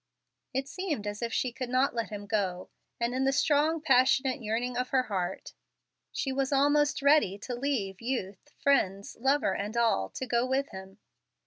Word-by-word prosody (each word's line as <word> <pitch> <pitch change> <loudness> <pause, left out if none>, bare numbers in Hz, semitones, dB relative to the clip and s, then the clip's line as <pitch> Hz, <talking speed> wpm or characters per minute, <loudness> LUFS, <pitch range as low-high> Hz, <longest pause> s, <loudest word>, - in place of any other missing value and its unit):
It 265 +1 -2
seemed 305 - -3
as 205 +1 -4
if 235 -1 -2
she 245 +4 0
could 255 0 -5
not 255 +2 +2
let 230 -1 -2
him 205 -1 -6
go, 195 -4 -2 0.3
and 235 +1 0
in 260 +1 0
the 270 - +3
strong, 300 +3 +2
passionate 260 -2 +3
yearning 235 +3 -2
of 250 +1 -1
her 260 -1 +2
heart, 190 -5 -4 0.6
she 270 - -2
was 270 +1 -1
almost 290 +1 +3
ready 280 -9 +4
to 245 +5 -6
leave 240 -7 -2
youth, 230 0 -4
friends, 200 -8 +1
lover, 270 -4 +2
and 210 +4 -4
all, 225 - +2
to 260 - -5
go 240 -1 +1
with 265 +2 0
him. 190 0 -10
250 Hz, 180 wpm, -29 LUFS, 205-275 Hz, 0.6 s, ready